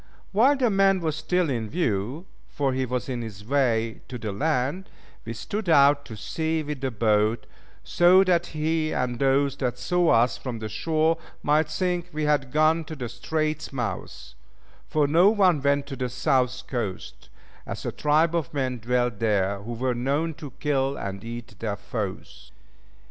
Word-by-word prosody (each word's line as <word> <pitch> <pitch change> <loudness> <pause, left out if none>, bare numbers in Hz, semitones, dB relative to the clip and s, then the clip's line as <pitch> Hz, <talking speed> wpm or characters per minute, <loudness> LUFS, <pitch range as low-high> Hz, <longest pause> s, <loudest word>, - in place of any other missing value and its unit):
While 255 +8 +4
the 250 -4 +2
man 195 -1 +4
was 160 -3 -1
still 170 +3 0
in 115 -6 -2
view 130 - -1 0.2
(for 140 -2 -1
he 130 0 -1
was 125 0 -2
on 125 -3 -3
his 105 -3 -8
way 115 -4 +1
to 125 - -6
the 110 -3 -4
land), 145 - -1 0.4
we 115 - -4
stood 195 - -4
out 140 -2 +5
to 110 - -9
sea 160 +8 -2
with 150 -2 -5
the 135 - 0
boat, 110 -1 +1 0.4
so 180 +2 +5
that 175 -2 +2
he 155 0 -1
and 125 -1 -1
those 140 0 +2
that 125 -3 -2
saw 175 +7 +1
us 115 +1 +3
from 125 -3 -5
the 110 -1 -5
shore 160 +7 +1 0.2
might 150 +1 +2
think 175 +2 -1
we 155 -1 -3
had 145 -3 +1
gone 155 +2 +3
to 155 - -7
the 125 -5 -5
straits' 155 +5 -2
mouth, 120 - -5 0.5
for 150 -1 +2
no 170 +7 +5
one 190 -8 +3
went 140 0 +2
to 140 - -6
the 125 -1 -3
South 130 +1 0
coast, 110 -8 -5 0.4
as - - -6
a - - -1
tribe 155 +3 +2
of 165 -5 -1
men 130 -3 -1
dwelt 120 -1 0
there 100 -3 +1
who 115 +4 -6
were 125 +2 -1
known 140 +7 -1
to 145 0 -9
kill 135 -2 0
and 100 0 -5
eat 115 0 -7
their 105 -2 -2
foes. 95 - -6
135 Hz, 175 wpm, -25 LUFS, 120-160 Hz, 0.5 s, out